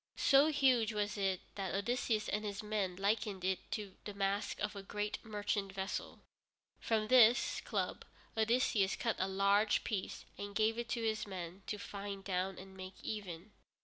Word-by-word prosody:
So 275 Hz, +2 st, +6 dB
huge 260 Hz, -7 st, +3 dB
was 205 Hz, -1 st, -1 dB
it 195 Hz, -3 st, 0 dB
that 195 Hz, -3 st, -3 dB
Odysseus 215 Hz, +1 st, 0 dB
and 210 Hz, +1 st, -1 dB
his 205 Hz, 0 st, -4 dB
men 210 Hz, -4 st, -1 dB
likened 200 Hz, 0 st, 0 dB
it 190 Hz, -1 st, +1 dB
to 205 Hz, -3 st, -4 dB
the 205 Hz, -, -6 dB
mast 200 Hz, +1 st, -1 dB
of 210 Hz, 0 st, -2 dB
a 200 Hz, -, -5 dB
great 210 Hz, +1 st, -3 dB
merchant 205 Hz, -2 st, -2 dB
vessel. 195 Hz, 0 st, -4 dB, 0.6 s
From 220 Hz, -2 st, +1 dB
this 245 Hz, 0 st, +6 dB
club -, -, -2 dB, 0.3 s
Odysseus 220 Hz, -3 st, +2 dB
cut 230 Hz, -2 st, -1 dB
a 185 Hz, -, +1 dB
large 200 Hz, +2 st, +3 dB
piece 200 Hz, -4 st, -3 dB
and 200 Hz, 0 st, -5 dB
gave 220 Hz, +1 st, +2 dB
it 235 Hz, -, -4 dB
to 230 Hz, -, -1 dB
his 215 Hz, -1 st, 0 dB
men 185 Hz, -1 st, -6 dB
to 210 Hz, -, -2 dB
fine 200 Hz, -1 st, -6 dB
down 190 Hz, 0 st, -1 dB
and 190 Hz, +1 st, -10 dB
make 185 Hz, 0 st, -8 dB
even. 200 Hz, -2 st, -5 dB
205 Hz, 170 wpm, -35 LUFS, 195-220 Hz, 0.6 s, So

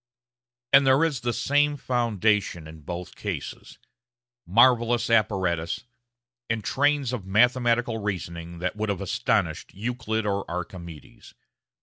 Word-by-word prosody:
And 135 Hz, 0 st, +7 dB
there 135 Hz, +4 st, +5 dB
is 155 Hz, -6 st, 0 dB
the 120 Hz, 0 st, -1 dB
same 145 Hz, +4 st, +1 dB
foundation 110 Hz, -, 0 dB
in 80 Hz, 0 st, -11 dB
both 85 Hz, +4 st, -6 dB
cases -, -, -6 dB, 0.7 s
marvellous 120 Hz, +3 st, +4 dB
apparatus, 95 Hz, -7 st, +1 dB, 0.7 s
and 110 Hz, -1 st, -1 dB
trains 145 Hz, -1 st, +1 dB
of 105 Hz, -7 st, -5 dB
mathematical 120 Hz, +2 st, +2 dB
reasoning 85 Hz, -4 st, -5 dB
that 90 Hz, +4 st, -3 dB
would 110 Hz, 0 st, -2 dB
have 100 Hz, -2 st, -2 dB
astonished 95 Hz, -, -1 dB
Euclid 110 Hz, 0 st, -2 dB
or 100 Hz, -1 st, 0 dB
Archimedes. 85 Hz, -3 st, -8 dB
110 Hz, 115 wpm, -25 LUFS, 90-120 Hz, 0.7 s, And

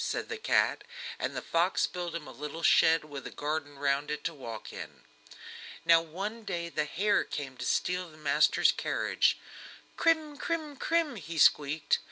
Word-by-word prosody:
said -, -, -2 dB
the 450 Hz, -, -3 dB
cat, 435 Hz, -, +2 dB, 0.4 s
and -, -, -2 dB
the -, -, -4 dB
fox 170 Hz, +3 st, +2 dB
built 175 Hz, -2 st, -5 dB
him 165 Hz, -3 st, -5 dB
a -, -, -8 dB
little 150 Hz, +5 st, -7 dB
shed 160 Hz, -1 st, +5 dB
with 140 Hz, -3 st, -7 dB
a -, -, -6 dB
garden 145 Hz, -1 st, -3 dB
round 140 Hz, +1 st, 0 dB
it 150 Hz, 0 st, -3 dB
to 165 Hz, -, -2 dB
walk 115 Hz, -7 st, -8 dB
in. -, -, -9 dB, 0.8 s
Now 165 Hz, 0 st, +7 dB
one 195 Hz, +8 st, -5 dB
day 175 Hz, -4 st, -3 dB
the 155 Hz, -2 st, -1 dB
hare 200 Hz, +7 st, +1 dB
came 135 Hz, -3 st, -5 dB
to -, -, -5 dB
steal 180 Hz, -1 st, 0 dB
the 155 Hz, -, -16 dB
man's 150 Hz, 0 st, +4 dB
cabbage. -, -, +2 dB, 0.6 s
"Kreem 315 Hz, -3 st, +2 dB
kreem 315 Hz, -3 st, -2 dB
kreem!" 315 Hz, -2 st, 0 dB
he 165 Hz, +1 st, -7 dB
squeaked. 145 Hz, 0 st, +4 dB
165 Hz, 175 wpm, -30 LUFS, 145-195 Hz, 0.8 s, Now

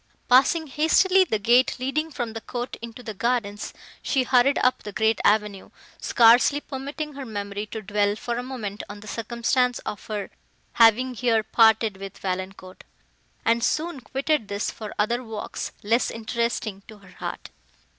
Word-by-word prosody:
Passing 280 Hz, +6 st, +4 dB
hastily 345 Hz, +6 st, +3 dB
the 220 Hz, -, 0 dB
gate 240 Hz, +5 st, +3 dB
leading 275 Hz, +5 st, -2 dB
from 240 Hz, -7 st, -4 dB
the 225 Hz, -, -6 dB
court 245 Hz, +2 st, -5 dB
into 235 Hz, +1 st, -9 dB
the 220 Hz, -, -6 dB
gardens, 210 Hz, -2 st, -2 dB, 0.3 s
she 265 Hz, -3 st, +1 dB
hurried 255 Hz, +2 st, +3 dB
up 255 Hz, -, +2 dB
the 210 Hz, -, -7 dB
great 220 Hz, +2 st, +1 dB
avenue, 210 Hz, -2 st, +1 dB, 0.3 s
scarcely 240 Hz, +5 st, +5 dB
permitting 290 Hz, +2 st, -6 dB
her 275 Hz, 0 st, -7 dB
memory 205 Hz, -2 st, -5 dB
to 220 Hz, 0 st, -7 dB
dwell 205 Hz, 0 st, +1 dB
for 235 Hz, +2 st, -4 dB
a -, -, -1 dB
moment 230 Hz, -6 st, -5 dB
on 205 Hz, 0 st, -9 dB
the 215 Hz, -, -12 dB
circumstance 240 Hz, +3 st, 0 dB
of 205 Hz, -, -5 dB
her 210 Hz, -2 st, -4 dB, 0.4 s
having 235 Hz, +3 st, +5 dB
here 230 Hz, -2 st, +1 dB
parted 220 Hz, -1 st, +3 dB
with 195 Hz, 0 st, -8 dB
Valancourt, 185 Hz, 0 st, -5 dB, 0.6 s
and 230 Hz, +1 st, +2 dB
soon 310 Hz, +3 st, -1 dB
quitted 270 Hz, -1 st, -1 dB
this 200 Hz, +1 st, -2 dB
for 215 Hz, -2 st, -8 dB
other 235 Hz, +4 st, 0 dB
walks 220 Hz, -3 st, -5 dB
less 230 Hz, +4 st, +2 dB
interesting 230 Hz, -3 st, -3 dB
to 215 Hz, -, -12 dB
her 195 Hz, -2 st, -18 dB
heart. -, -, -6 dB
230 Hz, 160 wpm, -24 LUFS, 210-255 Hz, 0.6 s, scarcely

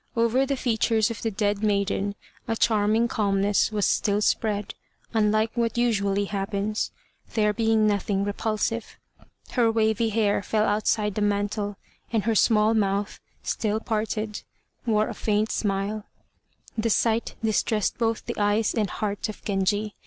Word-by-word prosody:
Over 235 Hz, +3 st, +2 dB
the 275 Hz, 0 st, -1 dB
features 225 Hz, -2 st, +1 dB
of 230 Hz, -, -6 dB
the 225 Hz, -, 0 dB
dead 205 Hz, -1 st, -1 dB
maiden 200 Hz, -1 st, 0 dB, 0.3 s
a 225 Hz, -, 0 dB
charming 220 Hz, +1 st, +2 dB
calmness 200 Hz, -1 st, +1 dB
was 210 Hz, -2 st, +1 dB
still 205 Hz, 0 st, +2 dB
spread, 210 Hz, -1 st, 0 dB, 0.4 s
unlike 215 Hz, 0 st, +2 dB
what 235 Hz, -1 st, -1 dB
usually 205 Hz, -4 st, +1 dB
happens, 200 Hz, +1 st, -2 dB, 0.5 s
there 210 Hz, -2 st, +3 dB
being 220 Hz, -1 st, +2 dB
nothing 200 Hz, -1 st, +1 dB
repulsive. 215 Hz, +2 st, -2 dB, 0.5 s
Her 240 Hz, -3 st, +3 dB
wavy 220 Hz, 0 st, +1 dB
hair 210 Hz, -2 st, +1 dB
fell 215 Hz, +2 st, +1 dB
outside 210 Hz, 0 st, +1 dB
the 210 Hz, -, -2 dB
mantle, 205 Hz, 0 st, -1 dB, 0.3 s
and 225 Hz, -3 st, +1 dB
her 225 Hz, +2 st, +1 dB
small 215 Hz, 0 st, +4 dB
mouth, 200 Hz, -1 st, 0 dB, 0.2 s
still 215 Hz, -1 st, -1 dB
parted, 215 Hz, -1 st, -2 dB, 0.5 s
wore 215 Hz, -1 st, +2 dB
a 235 Hz, -, -4 dB
faint 210 Hz, +1 st, 0 dB
smile. 200 Hz, +1 st, -1 dB, 0.7 s
The 230 Hz, 0 st, 0 dB
sight 225 Hz, +1 st, +1 dB
distressed 215 Hz, -1 st, 0 dB
both 225 Hz, -1 st, 0 dB
the -, -, -4 dB
eyes 205 Hz, +1 st, +2 dB
and 210 Hz, -4 st, 0 dB
heart 205 Hz, +1 st, -3 dB
of 215 Hz, -, -9 dB
Genji. 205 Hz, +1 st, 0 dB
215 Hz, 145 wpm, -25 LUFS, 205-225 Hz, 0.7 s, small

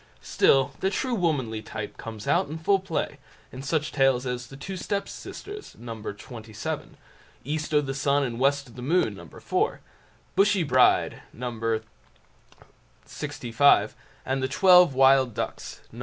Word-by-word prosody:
Still 135 Hz, 0 st, +3 dB
the 190 Hz, -, +1 dB
true 250 Hz, +5 st, -2 dB
womanly 140 Hz, -, 0 dB
type 110 Hz, -1 st, -7 dB
comes 110 Hz, -2 st, -8 dB
out -, -, +2 dB
in 155 Hz, -, -5 dB
full 195 Hz, +5 st, +2 dB
play 185 Hz, -4 st, -3 dB, 0.3 s
in 130 Hz, -, -8 dB
such 150 Hz, +2 st, -1 dB
tales 135 Hz, -2 st, +2 dB
as 125 Hz, -1 st, -4 dB
"The 135 Hz, -, -12 dB
Two 190 Hz, +7 st, -6 dB
Step 200 Hz, +2 st, -2 dB
Sisters", 415 Hz, 0 st, -9 dB
No. 120 Hz, -1 st, -7 dB
xvii; 110 Hz, 0 st, -6 dB, 0.6 s
"East 150 Hz, +3 st, -3 dB
o' 150 Hz, -1 st, +4 dB
the 135 Hz, -2 st, -4 dB
Sun 140 Hz, +1 st, +1 dB
and 120 Hz, -3 st, -3 dB
West 140 Hz, +1 st, +2 dB
o' -, -, -15 dB
the 125 Hz, -, -9 dB
Moon", 165 Hz, +8 st, +1 dB
No. -, -, -11 dB
iv; 410 Hz, +5 st, -1 dB, 0.6 s
"Bushy 195 Hz, -2 st, +3 dB
Bride", 130 Hz, -4 st, +3 dB
No. 125 Hz, +1 st, -5 dB, 1.5 s
xlv, 120 Hz, +4 st, +2 dB, 0.3 s
and 135 Hz, 0 st, -1 dB
"The 130 Hz, -, 0 dB
Twelve 180 Hz, 0 st, +6 dB
Wild 130 Hz, -2 st, +5 dB
Ducks", -, -, -5 dB
No. -, -, -11 dB
135 Hz, 155 wpm, -26 LUFS, 125-165 Hz, 1.5 s, Twelve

